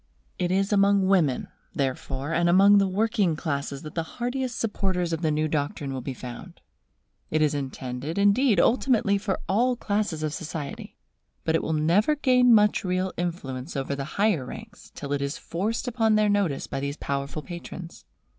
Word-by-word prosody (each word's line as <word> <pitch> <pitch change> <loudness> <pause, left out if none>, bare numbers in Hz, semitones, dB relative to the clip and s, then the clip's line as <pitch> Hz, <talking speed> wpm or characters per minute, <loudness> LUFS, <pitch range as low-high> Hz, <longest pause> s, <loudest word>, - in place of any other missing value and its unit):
It 180 -1 0
is 195 +3 +1
among 200 -1 +4
women, 175 -9 +2 0.3
therefore, 135 +2 -2
and 170 +1 +2
among 200 +3 +7
the 195 - +3
working 205 -3 +1
classes 140 -3 -3
that 155 - -8
the 165 - -1 0.2
heartiest 245 0 -2
supporters 185 -5 -1
of 165 - -2
the 160 - +1
new 155 +1 +1
doctrine 145 -2 -2
will 130 - -4
be 130 +1 -5
found. 125 0 -9 0.7
It 155 - +1
is 150 - +2
intended, 135 +2 -4
indeed, 205 +2 +4
ultimately 225 -4 +3
for 195 -1 -2
all 245 +6 +2
classes 205 -8 -2
of 155 -1 -1
society. 160 -4 -6 0.5
But 160 - 0
it 165 - +2
will 160 - -2
never 175 - +3
gain 250 -4 +4
much 210 -2 +4
real 185 0 -1
influence 150 -5 -4
over 135 +1 -2
the 140 -1 -4
higher 200 -8 +2
ranks 215 - -10
till 140 0 -4
it 140 - -1
is 140 0 -2
forced 215 +9 -3
upon 225 -3 +2
their 215 0 +3
notice 200 -9 +1
by 135 - -4
these 140 +2 -3
powerful 140 +2 -3
patrons. 175 0 -8
175 Hz, 175 wpm, -26 LUFS, 145-205 Hz, 0.7 s, among